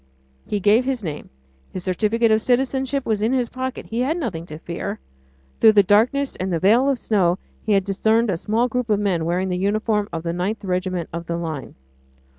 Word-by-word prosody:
He 210 - -1
gave 210 +5 +4
his 255 -3 -2
name. 155 -4 -5 0.4
His 185 - -6
certificate 220 +5 +1
of 220 0 +3
citizenship 265 +2 0
was 215 -2 0
in 225 +4 +1
his 250 -3 0
pocket; 260 0 -5
he 230 - -4
had 280 +7 0
nothing 180 - -4
to 155 - -8
fear. 170 +1 -5 0.6
Through 220 - +7
the 205 -1 +6
darkness 240 +8 +2
and 185 +1 -3
the 170 - +1
veil 225 - +4
of 275 - +1
snow 190 -6 +1 0.2
he 215 - 0
had 195 -1 +3
discerned 220 +3 +1
a - - 0
small 220 +7 0
group 250 -1 -2
of 210 -1 +2
men 185 -6 0
wearing 180 +3 0
the 180 - -1
uniform 210 +1 0
of 165 -1 -4
the 170 -1 -2
9th 195 +6 -2
Regiment 185 -2 -2
of 170 0 -5
the 170 - -2
Line. 160 -5 -5
210 Hz, 210 wpm, -22 LUFS, 180-235 Hz, 0.6 s, Through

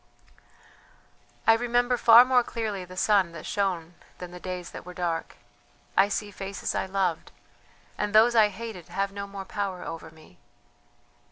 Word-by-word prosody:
"I 225 - +7
remember 245 +2 +1
far 235 0 +8
more 255 -1 +4
clearly 215 -6 -4
the 185 +1 -12
sun 195 -4 +2
that 155 - -9
shone 180 -5 -2 0.2
than 180 -1 -8
the 180 - -9
days 180 -1 -6
that - - -9
were 180 0 -11
dark. 170 -2 -3 0.6
I 195 +1 +4
see 205 0 -3
faces 195 0 -5
I - - -2
loved, 190 -3 -1 0.7
and 210 0 -1
those 220 +3 +6
I 220 -2 +6
hated 210 -3 -8
have 195 0 -2
no 200 0 -6
more 200 -1 -8
power 195 -2 -4
over 165 0 -7
me. 155 - -19
195 Hz, 160 wpm, -27 LUFS, 180-220 Hz, 0.7 s, far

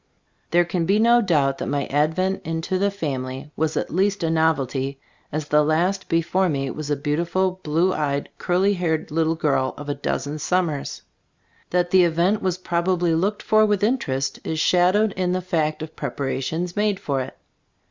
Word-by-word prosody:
There 175 0 +3
can 170 -1 -1
be 200 - +3
no 235 +2 +5
doubt 140 -9 +1
that - - -3
my 145 -1 -1
ad 150 +3 +1
vent 190 +1 0
into 165 +3 -2
the 200 +1 +2
family 135 -6 -4
was 160 0 -1
at - - -2
least 195 +1 +1
a 165 - +1
novelty, 140 -4 0 0.3
as 155 0 -3
the 150 0 +4
last 175 +6 0
before 175 +3 +1
me 135 -3 -1
was 155 -1 -6
a 145 - +2
beautiful 170 +6 -1
blue 170 +4 +1
eyed, 145 -2 -1
curly 185 +3 +2
haired 165 -4 -1
little 160 +1 +1
girl 140 -5 0
of 145 0 -7
a - - +1
dozen 145 +1 -3
summers. 165 -5 -1 0.7
That 175 0 +1
the 185 -1 +6
event 175 +5 +2
was 185 -1 0
probably 175 -1 0
looked 195 +6 0
for 215 -1 +4
with 205 -2 +1
interest 140 - 0
is 160 - -2
shadowed 185 +6 +3
in 185 -1 -1
the 185 - 0
fact 160 -4 -1
of 155 - -9
preparations 150 +6 -3
made 205 -2 +1
for 135 -2 -1
it. 130 - -7
165 Hz, 180 wpm, -23 LUFS, 150-185 Hz, 0.7 s, the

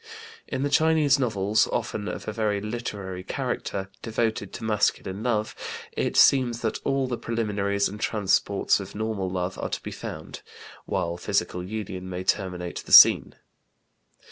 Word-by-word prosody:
In 130 - -2
the 145 - 0
Chinese 155 -2 +4
novels, 105 -4 +2
often 105 -1 -2
of - - -6
a 110 - -3
very 105 -2 0
literary 100 -4 -5
character, 95 +1 -3
devoted 110 -3 -2
to - - -7
masculine 105 -2 0
love, 110 -3 0 0.4
it - - -2
seems 120 -4 +5
that 110 - -1
all 135 -1 +1
the 125 -2 -3
preliminaries 100 -3 0
and 105 +2 -8
transports 100 -1 +1
of 100 0 -8
normal 105 -3 -2
love 90 0 -3
are - - -3
to - - -4
be - - -6
found, - - -7 0.4
while 85 0 -2
physical 90 0 -1
union 95 -2 -5
may 90 0 -4
terminate 90 -2 -2
the - - -9
scene. - - +8
105 Hz, 150 wpm, -26 LUFS, 95-115 Hz, 0.4 s, scene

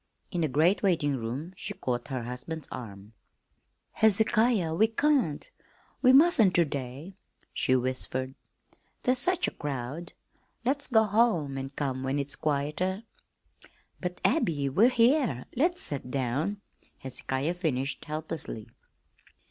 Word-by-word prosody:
In 175 - -1
the 160 - +2
great 160 +8 +3
waiting 165 -8 +2
room 130 +9 -5
she 205 +2 -5
caught 125 -9 -3
her 130 -4 -3
husband's 125 +7 -6
arm. 105 -3 -8 0.8
"Hezekiah, 220 -3 +3
we 215 +7 +4
can't, 235 - +1 0.5
we 255 - +6
mustn't 265 - +6
ter 175 - +5
day," 140 +4 -6 0.4
she 130 - +2
whispered. 130 +1 0 0.7
"There's 255 0 +2
such 360 +6 +2
a - - -2
crowd. 145 +3 -5 0.5
Let's 280 +3 +1
go 220 -3 +4
home 205 - +2
an' 135 0 -4
come 135 -2 -3
when 135 +2 -1
it's 140 0 -2
quieter." 155 +7 -1 1.0
"But, 180 -1 -4
Abby, 145 -4 +2
we 210 - +5
here, 240 - +2
let's 345 +8 +1
set 135 -3 -5
down," 140 +10 -1 0.4
Hezekiah 130 +4 -3
finished 145 -7 -2
helplessly. 155 -7 -5
155 Hz, 125 wpm, -28 LUFS, 135-215 Hz, 1.0 s, we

